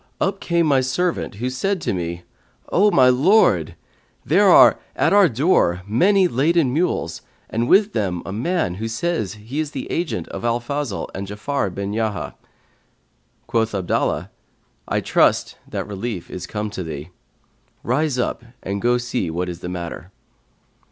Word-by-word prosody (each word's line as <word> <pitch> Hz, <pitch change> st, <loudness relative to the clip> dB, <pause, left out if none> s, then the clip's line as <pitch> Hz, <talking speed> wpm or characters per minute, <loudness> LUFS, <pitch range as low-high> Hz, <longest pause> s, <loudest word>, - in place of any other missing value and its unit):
up 195 Hz, 0 st, 0 dB
came 170 Hz, -1 st, +1 dB
my 140 Hz, -4 st, +3 dB
servant, 165 Hz, -, -1 dB
who 120 Hz, +5 st, -3 dB
said 180 Hz, +10 st, -1 dB
to -, -, -2 dB
me, 85 Hz, -1 st, -4 dB, 0.5 s
O 205 Hz, +4 st, +4 dB
my 130 Hz, -9 st, +5 dB
lord, 170 Hz, -, +3 dB, 0.5 s
there -, -, +4 dB
are -, -, +7 dB, 0.2 s
at -, -, +2 dB
our 200 Hz, -4 st, +6 dB
door 115 Hz, -, +2 dB
many 185 Hz, -, +3 dB
laden 150 Hz, -1 st, +2 dB
mules 175 Hz, +5 st, -1 dB, 0.3 s
and 115 Hz, +2 st, 0 dB
with 205 Hz, +2 st, +5 dB
them 90 Hz, -5 st, -1 dB
a -, -, -5 dB
man, 125 Hz, -, -1 dB
who 115 Hz, -, -2 dB
says 115 Hz, -, -2 dB
he 115 Hz, +8 st, -6 dB
is 155 Hz, -2 st, -1 dB
the -, -, -5 dB
agent 170 Hz, -1 st, -2 dB
of -, -, -7 dB
Al 120 Hz, 0 st, +1 dB
Fazl 140 Hz, -3 st, -3 dB
and 95 Hz, +1 st, -5 dB
Ja'afar 105 Hz, +1 st, -2 dB
bin 100 Hz, +1 st, -3 dB
Yahya.' 110 Hz, -2 st, -2 dB, 1.1 s
Quoth 115 Hz, -2 st, 0 dB
Abdallah, 95 Hz, -3 st, -1 dB, 0.6 s
I -, -, 0 dB
trust -, -, +2 dB
that -, -, -4 dB
relief 105 Hz, -1 st, -5 dB
is 90 Hz, 0 st, -6 dB
come 105 Hz, 0 st, -4 dB
to 95 Hz, -, -5 dB
thee: 80 Hz, -1 st, -6 dB, 0.7 s
rise 135 Hz, +2 st, 0 dB
up 125 Hz, -, -2 dB, 0.2 s
and 100 Hz, +1 st, -3 dB
go 120 Hz, +1 st, +3 dB
see 120 Hz, -6 st, -2 dB
what 90 Hz, +2 st, -2 dB
is 85 Hz, -1 st, -6 dB
the 90 Hz, -, -6 dB
matter.' 90 Hz, 0 st, -6 dB
120 Hz, 160 wpm, -21 LUFS, 100-155 Hz, 1.1 s, are